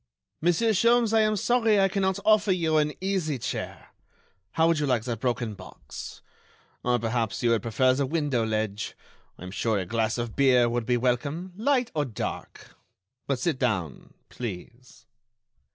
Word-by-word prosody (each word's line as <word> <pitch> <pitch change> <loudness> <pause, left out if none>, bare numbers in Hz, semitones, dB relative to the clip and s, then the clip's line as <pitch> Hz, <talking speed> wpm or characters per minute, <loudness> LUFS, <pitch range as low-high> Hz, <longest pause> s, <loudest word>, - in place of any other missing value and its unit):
"Monsieur 175 +7 +2
Sholmes, 230 +2 +3
I 225 - +5
am 215 0 +2
sorry 225 0 +2
I 195 - +5
cannot 190 -1 0
offer 215 -2 +4
you 165 -4 +1
an 150 0 +2
easy 185 -7 -1
chair. 115 - -5 0.6
How 160 - +3
would 165 -2 +2
you 145 - 0
like 125 -4 +1
that 120 -3 -4
broken 120 -2 -1
box? 95 -2 -10 0.6
Or 125 0 +2
perhaps 115 0 -2
you 120 - +3
would 115 -3 +2
prefer 130 +4 +2
the 135 +1 0
window 145 -6 0
ledge? 110 -1 -2 0.4
I - - -11
am 90 - -7
sure 110 +2 0
a 95 - -2
glass 110 +3 -1
of 120 -2 -4
beer 130 -3 +4
would 120 -1 -2
be 125 -1 +2
welcome... 140 +9 -1
light 255 +3 +1
or 150 -2 0
dark?... 115 -5 -6 0.5
But 140 - 0
sit 135 +1 -1
down, 95 - -2
please." 115 +2 -8
130 Hz, 170 wpm, -26 LUFS, 115-185 Hz, 0.6 s, I